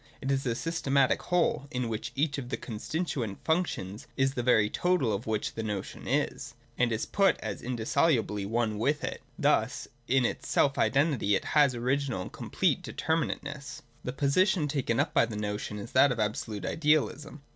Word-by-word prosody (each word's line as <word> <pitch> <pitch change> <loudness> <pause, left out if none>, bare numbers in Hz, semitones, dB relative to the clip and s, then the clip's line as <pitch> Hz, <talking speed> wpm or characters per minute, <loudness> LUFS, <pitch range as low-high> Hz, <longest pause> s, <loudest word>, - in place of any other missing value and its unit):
It 135 - -2
is 135 -1 0
a 115 - 0
systematic 140 -3 +1
whole, 175 -5 +1
in 125 -2 -2
which 115 +1 -4
each 145 0 0
of 125 -2 -7
its - - -4
constituent 120 - -3
functions 160 - -1
is 135 0 +2
the 125 - -2
very 120 -4 +4
total 150 - +1
which 110 -1 -2
the 115 - -4
notion 105 -3 -5
is, - - -1 0.2
and 125 -1 +2
is 110 0 -1
put 195 -1 +3
as - - -5
in 125 +1 -3
dissolubly 115 -3 +1
one 110 0 -1
with 145 +6 +1
it. - - -4 0.2
Thus - - +1 0.2
in 130 0 +3
its - - -3
self 140 0 +2
identity 125 -4 +2
it - - -2
has 145 -4 +4
original 125 -3 -1
and - - -9
complete - - 0
determinateness. 150 -3 -3 0.2
The 125 - -3
position 150 +5 +2
taken 135 -5 0
up - - +1
by 115 - +4
the 110 -2 -5
notion 105 0 -3
is 105 +3 -7
that 140 - +5
of 125 - -2
absolute 105 -1 -2
idealism. 150 -1 0
130 Hz, 180 wpm, -29 LUFS, 110-145 Hz, 0.2 s, that